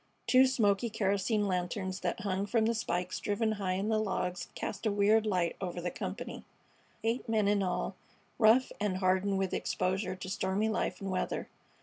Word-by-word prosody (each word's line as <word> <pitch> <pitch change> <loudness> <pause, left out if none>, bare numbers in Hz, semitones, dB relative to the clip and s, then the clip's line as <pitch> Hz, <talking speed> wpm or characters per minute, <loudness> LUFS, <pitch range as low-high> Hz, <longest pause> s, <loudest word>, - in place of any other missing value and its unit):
Two 260 +1 +6
smoky 225 -3 +2
kerosene 205 0 +1
lanterns 185 +1 -2
that - - -2
hung 200 -1 -1
from 225 +1 +2
spikes 180 -4 -2
driven 220 +2 0
high 200 -3 -1
in 195 +3 -1
the 220 -1 +2
logs 185 -3 -2
cast 210 +3 -3
a - - +2
weird 210 +2 +3
light 180 -4 +1
over 180 -2 -3
the 175 0 -2
company, 215 +5 -5 0.6
eight 230 +2 -1
men 215 -2 +2
in 205 0 +3
all, 185 -2 -1 0.4
rough 235 +3 +5
and 205 -3 0
hardened 190 +1 +2
with 190 -1 -1
exposure 185 0 -1
to 185 - -8
stormy 190 +3 0
life 220 - -1
and 195 -1 -3
weather. 185 - -2
200 Hz, 175 wpm, -31 LUFS, 185-220 Hz, 0.6 s, Two